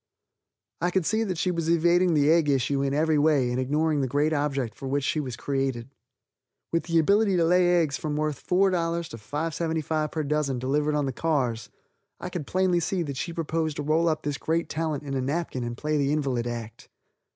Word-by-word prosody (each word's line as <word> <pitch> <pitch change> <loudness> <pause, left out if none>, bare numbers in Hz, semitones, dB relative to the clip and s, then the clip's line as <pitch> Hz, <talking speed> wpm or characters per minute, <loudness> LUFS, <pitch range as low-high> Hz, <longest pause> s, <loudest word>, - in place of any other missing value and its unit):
I 175 - +2
could 180 -1 0
see 220 +4 +1
that 185 -4 -3
she 180 +2 0
was 165 -2 -2
evading 170 +1 +3
the 145 +1 +4
egg 165 -3 +3
issue 135 0 +1
in 140 0 0
every 155 +1 +2
way 145 -5 +3
and 125 - -1
ignoring 150 +3 +1
the 135 - 0
great 145 +4 +1
object 140 -6 -1
for 135 - -7
which 140 +1 0
she 155 - 0
was 130 -5 -4
created. 135 -2 -2 0.8
With 165 - 0
the 165 -1 +1
ability 200 +4 +3
to 170 - +3
lay 175 +1 +4
eggs 150 -4 -1
worth 150 -1 -1
from 180 +1 0
$4 170 -1 -1
to 115 - -8
$5.75 155 +5 -2
per 155 - -2
dozen 145 -2 0
delivered 145 +4 0
on 145 -1 +1
the 135 - -2
cars, 125 -7 -1 0.5
I - - -5
could 170 -6 -5
plainly 185 -1 +2
see 175 +1 -1
that 140 -4 -5
she 170 - -3
proposed 160 -2 -2
to 150 - -3
roll 160 +3 +2
up 155 - -2
this 145 -1 -3
great 165 +1 -1
talent 155 -2 -2
in 140 -1 -5
a 135 - 0
napkin 140 -1 -2
and 120 0 -5
play 150 +1 -1
the 140 -1 +1
invalid 135 -6 -1
act. 115 -2 -7
150 Hz, 210 wpm, -26 LUFS, 140-165 Hz, 0.8 s, the